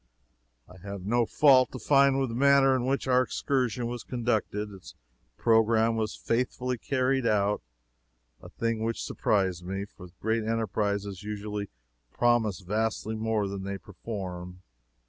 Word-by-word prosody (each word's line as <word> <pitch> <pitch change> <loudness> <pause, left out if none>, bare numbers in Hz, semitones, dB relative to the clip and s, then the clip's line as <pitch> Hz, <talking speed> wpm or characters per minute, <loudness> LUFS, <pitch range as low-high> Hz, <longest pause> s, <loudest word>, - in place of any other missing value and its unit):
I 90 - -15
have 100 0 -8
no 120 +2 +2
fault 130 -2 +5
to - - -4
find 140 +2 +4
with 135 -2 0
the 115 - -5
manner 135 0 +5
in 125 -1 -1
which 135 0 0
our 125 0 +4
excursion 125 -2 -1
was 120 0 -4
conducted. 110 -4 -2
Its 95 -2 -12 0.4
programme 115 0 +3
was 110 -1 -2
faithfully 125 +1 -1
carried 130 -1 0
out 105 -1 +1 0.8
a - - -11
thing 115 -1 -2
which 115 0 -2
surprised 95 -4 0
me, 95 +2 -4
for 90 -2 -13
great 110 +1 0
enterprises 105 -3 -1
usually 105 -1 -5 0.4
promise 115 -5 +2
vastly 110 +3 -1
more 110 -2 0
than 100 0 -5
they 100 0 -4
perform. 90 -3 -7
110 Hz, 145 wpm, -28 LUFS, 100-120 Hz, 0.8 s, fault